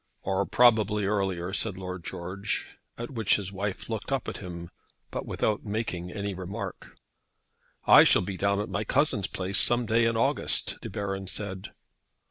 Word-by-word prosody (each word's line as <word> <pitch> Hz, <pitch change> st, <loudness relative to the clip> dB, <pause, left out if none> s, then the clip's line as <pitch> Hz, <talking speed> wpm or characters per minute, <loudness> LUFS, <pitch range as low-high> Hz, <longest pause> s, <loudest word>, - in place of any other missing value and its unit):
"Or -, -, 0 dB
probably 110 Hz, -4 st, +4 dB
earlier," 95 Hz, -3 st, -1 dB
said 100 Hz, -3 st, -1 dB
Lord 90 Hz, -2 st, -6 dB
George; 95 Hz, +5 st, -4 dB, 0.2 s
at 120 Hz, +2 st, -6 dB
which 115 Hz, -6 st, +2 dB
his 100 Hz, -2 st, -3 dB
wife 100 Hz, 0 st, -4 dB
looked 110 Hz, +3 st, -4 dB
up 135 Hz, -2 st, -1 dB
at -, -, -4 dB
him, 85 Hz, -2 st, -8 dB, 0.4 s
but -, -, -4 dB
without 105 Hz, -1 st, -1 dB
making 100 Hz, -5 st, -3 dB
any 100 Hz, +1 st, -3 dB
remark. 95 Hz, +4 st, -7 dB, 0.9 s
"I -, -, +9 dB
shall -, -, +5 dB
be 95 Hz, +1 st, -4 dB
down 100 Hz, +1 st, +1 dB
at 105 Hz, -, -2 dB
my 105 Hz, -, -2 dB
cousin's 125 Hz, -, +2 dB
place 95 Hz, 0 st, 0 dB
some 120 Hz, 0 st, +4 dB
day 115 Hz, +1 st, +3 dB
in 115 Hz, 0 st, +1 dB
August," 115 Hz, -, +1 dB
De -, -, -6 dB
Baron 95 Hz, -1 st, -4 dB
said. 95 Hz, -1 st, -4 dB
100 Hz, 165 wpm, -28 LUFS, 95-110 Hz, 0.9 s, I